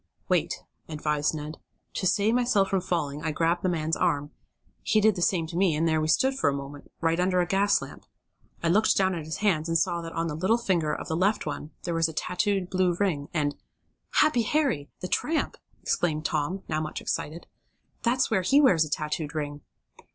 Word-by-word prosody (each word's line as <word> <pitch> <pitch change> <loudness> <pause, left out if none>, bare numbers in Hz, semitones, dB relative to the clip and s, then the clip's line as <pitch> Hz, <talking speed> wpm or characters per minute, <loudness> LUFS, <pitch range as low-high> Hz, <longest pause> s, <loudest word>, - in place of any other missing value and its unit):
"Wait," - - 0 0.3
advised 150 0 0
Ned. 150 +1 -6 0.3
"To 185 - 0
save 210 +4 +2
myself 240 -5 +2
from 195 -1 +2
falling 150 -5 -2
I 160 - -1
grabbed 165 +3 +1
the 185 - +1
man's 160 -2 0
arm. 145 -4 0 0.5
He 215 - +2
did 215 -1 +4
the 180 - -4
same 175 -2 +2
to 165 +1 -8
me, 180 -3 +3
and 160 +2 +1
there 160 -1 +2
we 155 - 0
stood, 265 +12 +3
for 265 - +1
a - - -1
moment, 140 +1 -8
right 165 +1 +1
under 180 0 +2
a 175 - +3
gas 195 +3 +2
lamp. - - -11 0.6
I 165 - +2
looked 210 +6 +3
down 190 -1 +3
at 165 -3 -4
his 160 - -4
hands, 165 -5 +2
and 165 - 0
I - - +7
saw 170 0 0
that 165 0 -7
on 165 - -1
the 165 - -3
little 190 +9 +2
finger 175 -9 0
of - - -4
the 160 - -1
left 195 +5 +1
one 150 0 -5
there 170 - -2
was 165 -1 +2
tattooed 195 +3 0
a - - -8
blue 185 -1 +1
ring, 160 -8 0
and 145 -3 0 0.3
" - - -47
"Happy 300 -6 +3
Harry 235 - 0
the 180 - -3
tramp!" 315 - 0 0.3
exclaimed 155 -3 0
Tom, 155 +6 -1
now 155 0 -1
much 155 0 -4
excited. 160 +3 -4 0.6
"That's 250 +1 +1
where 200 -4 +3
he 270 +11 +4
wears 185 - +5
a 155 - -5
tattooed 150 +1 -3
ring!" 145 -1 -4
170 Hz, 215 wpm, -27 LUFS, 155-195 Hz, 0.6 s, I